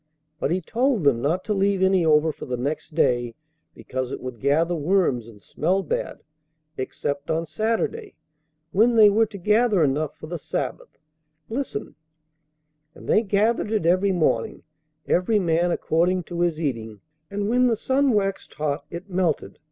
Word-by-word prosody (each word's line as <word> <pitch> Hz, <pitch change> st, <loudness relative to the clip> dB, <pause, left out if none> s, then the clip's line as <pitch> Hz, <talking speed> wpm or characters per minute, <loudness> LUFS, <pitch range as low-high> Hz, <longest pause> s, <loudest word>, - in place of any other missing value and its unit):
But -, -, 0 dB
He 180 Hz, +3 st, 0 dB
told 235 Hz, -, 0 dB
them 135 Hz, -5 st, +3 dB
not 165 Hz, +7 st, 0 dB
to 215 Hz, -, 0 dB
leave 195 Hz, -1 st, +1 dB
any 190 Hz, -2 st, +3 dB
over 155 Hz, 0 st, +4 dB
for -, -, -10 dB
the 125 Hz, -1 st, -2 dB
next 145 Hz, +4 st, -4 dB
day 120 Hz, -6 st, +1 dB, 0.4 s
because 130 Hz, 0 st, -4 dB
it -, -, -4 dB
would 130 Hz, -2 st, -7 dB
gather 155 Hz, +5 st, +2 dB
worms 155 Hz, -, +1 dB
and 105 Hz, -3 st, -15 dB
smell 190 Hz, +2 st, 0 dB
bad, -, -, -3 dB, 0.5 s
except 140 Hz, +2 st, -4 dB
on 165 Hz, +1 st, 0 dB
Saturday, 230 Hz, -, -2 dB, 0.6 s
when 230 Hz, +5 st, +3 dB
they 215 Hz, -2 st, +7 dB
were 220 Hz, +2 st, +3 dB
to 205 Hz, -, -9 dB
gather 210 Hz, 0 st, +3 dB
enough 145 Hz, +1 st, -1 dB
for -, -, -9 dB
the 170 Hz, +1 st, -5 dB
Sabbath. -, -, -5 dB, 0.5 s
Listen: 235 Hz, -, -4 dB, 1.0 s
'And -, -, -13 dB
they -, -, +4 dB
gathered 215 Hz, +1 st, +1 dB
it 215 Hz, -7 st, 0 dB
every 185 Hz, +3 st, +3 dB
morning, 155 Hz, -10 st, 0 dB, 0.4 s
every 185 Hz, +5 st, +2 dB
man 170 Hz, -2 st, +1 dB
according 175 Hz, +2 st, +1 dB
to 170 Hz, +1 st, -6 dB
his 170 Hz, -2 st, +1 dB
eating; 115 Hz, -8 st, -4 dB, 0.3 s
and 200 Hz, 0 st, -2 dB
when 250 Hz, +3 st, +3 dB
the 235 Hz, -, +2 dB
sun 270 Hz, +5 st, +1 dB
waxed 195 Hz, -3 st, -1 dB
hot, 150 Hz, -1 st, -2 dB
it 175 Hz, +3 st, -8 dB
melted. 180 Hz, -5 st, -1 dB
175 Hz, 165 wpm, -24 LUFS, 150-210 Hz, 1.0 s, they